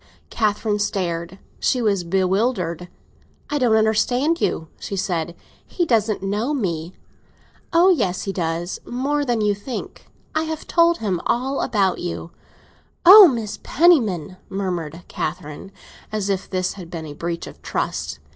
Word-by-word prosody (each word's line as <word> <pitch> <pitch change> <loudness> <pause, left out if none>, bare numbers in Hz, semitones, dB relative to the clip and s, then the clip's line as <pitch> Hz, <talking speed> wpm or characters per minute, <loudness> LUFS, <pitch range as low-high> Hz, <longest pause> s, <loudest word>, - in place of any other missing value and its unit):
Catherine 210 -1 0
stared—she 185 +4 -2
was 205 -6 +1
bewildered. 185 -1 0 0.6
"I 295 - +1
don't 240 -4 +3
understand 245 +9 +2
you," 160 - -1
she 200 - -5
said; 175 -4 -2 0.3
"he 350 - -2
doesn't 220 - +1
know 210 +9 -1
me." 175 - -3 0.8
"Oh 350 +2 +5
yes, 185 - 0
he 195 - -3
does; 170 0 -2
more 280 +4 -1
than 240 -5 0
you 210 -1 +2
think. 205 +6 -7 0.3
I 315 +1 0
have 315 -1 -5
told 340 0 +3
him 190 - -2
all 265 +3 0
about 195 -4 +1
you." 175 -1 -5 0.7
"Oh, 370 - +10
Aunt 215 -2 -5
Penniman!" 220 - +2
murmured 175 -4 -4
Catherine, 155 +5 -5 0.4
as 210 -2 -2
if 190 -1 -3
this 185 -1 -1
had 180 -4 -10
been 165 -2 -6
a 150 - -7
breach 170 +2 -4
of - - -12
trust. 75 -2 -3
200 Hz, 140 wpm, -22 LUFS, 175-245 Hz, 0.8 s, Oh